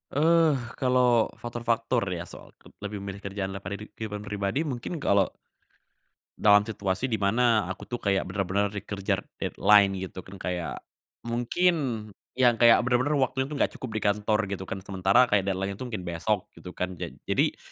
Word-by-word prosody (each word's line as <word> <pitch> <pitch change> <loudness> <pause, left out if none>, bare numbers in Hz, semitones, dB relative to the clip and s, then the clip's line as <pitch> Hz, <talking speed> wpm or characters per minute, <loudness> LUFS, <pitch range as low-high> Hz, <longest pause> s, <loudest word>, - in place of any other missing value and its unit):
Eh, 160 0 +4 0.2
kalau 125 -3 +3
faktor-faktor 120 0 -1 0.2
ya 85 - -4
soal - - -13
ke - - -19
lebih 105 -1 -5
memilih 100 0 -6
kerjaan 100 -1 -4
daripada 100 0 -5
ri 105 +1 -10
kehidupan 105 -2 -6
pribadi 105 +8 -1
mungkin 145 +3 -4
kalau 100 -1 +4 1.1
dalam 105 -1 +6
situasi 105 +2 -2
di 110 - 0
mana 110 +2 +3
aku 95 +4 -7
tuh 120 - -2
kayak 100 -3 +1
benar-benar 100 +1 0
dikejar 100 -1 -3 0.2
deadline 100 -2 +4
gitu 95 0 -6
kan 95 +2 -12
kayak 90 -2 -3 0.5
mungkin 120 +10 +2 0.6
yang 125 -2 +5
kayak 115 -1 +8
bener-bener 130 +4 +2
waktu 130 +1 0
itu 150 - -4
nggak - - +1
cukup 130 - -7
di - - -3
kantor 105 +1 +2
gitu 95 -1 -5
kan, - - -3
sementara 95 +6 +4
kayak 100 -4 +1
deadline-nya 95 +3 -3
tuh 125 - -4
mungkin 95 -6 -5
besok 90 +4 -1
gitu 90 - -10
kan. 90 0 -2
Ja 85 - -5 0.2
jadi, - - +1
105 Hz, 170 wpm, -27 LUFS, 95-120 Hz, 1.1 s, kayak